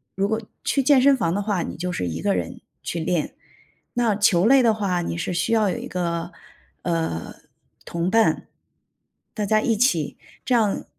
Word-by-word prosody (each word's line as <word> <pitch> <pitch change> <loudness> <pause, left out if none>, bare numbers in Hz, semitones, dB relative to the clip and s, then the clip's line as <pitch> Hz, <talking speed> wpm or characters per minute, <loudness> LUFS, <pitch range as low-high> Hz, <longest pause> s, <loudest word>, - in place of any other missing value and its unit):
如 195 +1 +1
果 220 +1 -1 0.2
去 275 - +1
健 270 -1 +5
身 275 0 +6
房 170 -7 0
的 205 - 0
话 205 -3 -1
你 - - -6
就 180 +3 -3
是 90 - -2
一 80 0 -4
个 100 -2 +1
人 85 -2 -4 0.2
去 170 - -3
练， 165 -1 -1 0.6
那 235 -4 +1
球 200 -3 +3
类 270 +3 +6
的 230 -3 +4
话 190 -5 -1
你 170 - -3
是 170 +2 -3
需 175 +6 0
要 215 -3 +3
有 180 - -2
一 - - -6
个， 170 -1 -3 0.5
呃， 165 - -2 0.5
同 170 +1 -2
伴。 225 +1 +2 0.9
大 210 -2 -2
家 215 +1 +3
一 225 - +1
起 190 - +1 0.3
这 255 - +1
样， 215 -4 +1
195 Hz, 200 characters per minute, -23 LUFS, 170-225 Hz, 0.9 s, 身